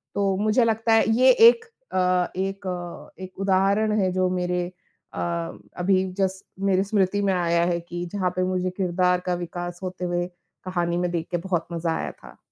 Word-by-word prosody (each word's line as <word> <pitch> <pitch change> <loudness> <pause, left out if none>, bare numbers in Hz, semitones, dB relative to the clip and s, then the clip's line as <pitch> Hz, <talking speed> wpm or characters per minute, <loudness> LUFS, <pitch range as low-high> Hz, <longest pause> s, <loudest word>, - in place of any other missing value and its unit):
तो 195 -1 +1
मुझे 215 +4 +3
लगता 225 0 +1
है 225 - +5 0.2
ये 255 0 +7
एक 455 - +6 0.3
अ, 180 -1 +2
एक 195 0 -3
अ, 175 +1 -7
एक 185 +1 -10
उदाहरण 200 +3 +2
है 185 -1 +1
जो 185 0 +1
मेरे 180 -1 -1 0.5
अ, - - -5 0.6
अभी 185 +1 +2 0.2
जस्ट 190 0 -1 0.2
मेरे 190 0 +3
स्मृति 205 -1 +1
में 195 -1 +2
आया 170 -1 +2
है 175 -1 0
कि 175 +1 -6
जहाँ 185 -3 0
पे 185 - +2
मुझे 185 0 0
किरदार 180 -1 +2
का 180 - +2
विकास 175 +1 -6
होते 180 0 -4
हुए, 175 0 -1 0.4
कहानी 175 -2 -1
में 180 0 0
देख 165 -1 -2
के 175 - +1
बहुत 175 -1 -2
मज़ा 165 0 -1
आया - - -3
था। - - -16
185 Hz, 185 wpm, -24 LUFS, 175-195 Hz, 0.6 s, ये